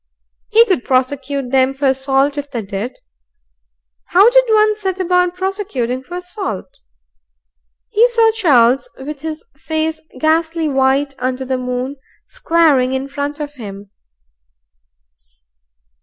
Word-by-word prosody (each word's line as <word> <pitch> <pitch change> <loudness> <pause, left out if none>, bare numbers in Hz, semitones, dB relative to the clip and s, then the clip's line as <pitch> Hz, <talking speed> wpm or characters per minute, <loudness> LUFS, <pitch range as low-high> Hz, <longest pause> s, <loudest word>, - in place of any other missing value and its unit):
He 455 +1 +6
could 375 - 0
prosecute 265 0 -1
them 265 0 +2
for 275 0 0
assault 270 +1 +1
if 285 -1 -5
they 240 -5 -4
did. 200 +5 -5 1.1
How 400 +6 +5
did - - +5
one 430 -1 +4
set 385 -3 -3
about 360 -1 +1
prosecuting 365 - -3
for 350 +6 -8
assault? 360 - -5 1.2
He 455 +3 +4
saw 460 -2 +3
Charles, 275 - +3
with 285 +1 -7
his 320 +6 -6
face 315 0 -2 0.2
ghastly 320 +1 +1
white 270 0 +1
under 255 +1 -2
the 260 0 -2
moon, 250 +2 -3 0.3
squaring 295 -6 +2
in 265 +1 -3
front 290 +1 -4
of 295 -1 -5
him. 200 -6 -10
285 Hz, 125 wpm, -17 LUFS, 260-360 Hz, 1.2 s, He